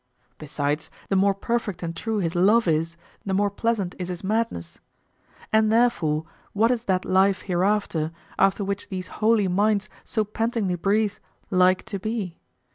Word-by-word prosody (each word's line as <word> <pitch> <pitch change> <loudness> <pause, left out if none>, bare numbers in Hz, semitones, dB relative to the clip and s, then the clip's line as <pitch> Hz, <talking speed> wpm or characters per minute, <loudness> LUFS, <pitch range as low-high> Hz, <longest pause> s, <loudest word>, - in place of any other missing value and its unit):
Besides, 150 0 -2 0.2
the 195 - +1
more 195 +1 +3
perfect 225 -3 -2
and 165 0 -4
true 220 +5 -2
his 170 -5 -1
love 200 +5 +4
is, 165 +1 0 0.3
the 190 -1 -1
more 205 +1 +2
pleasant 205 -3 -1
is 180 - -3
his 180 0 -6
madness. 190 - -2 0.7
And 220 0 +4
therefore, 170 -10 +2 0.3
what 225 +4 +3
is 240 -1 -1
that 185 -1 0
life 190 +1 +3
hereafter, 180 -4 0 0.3
after 195 +1 +3
which 200 0 -4
these 185 -1 -4 0.2
holy 215 -2 +4
minds 205 +2 +1
so 220 - -1
pantingly 220 -2 -1
breathe, 200 +4 +1 0.4
like 185 0 +3
to 200 - -5
be? 210 -4 -3
195 Hz, 155 wpm, -24 LUFS, 180-215 Hz, 0.7 s, love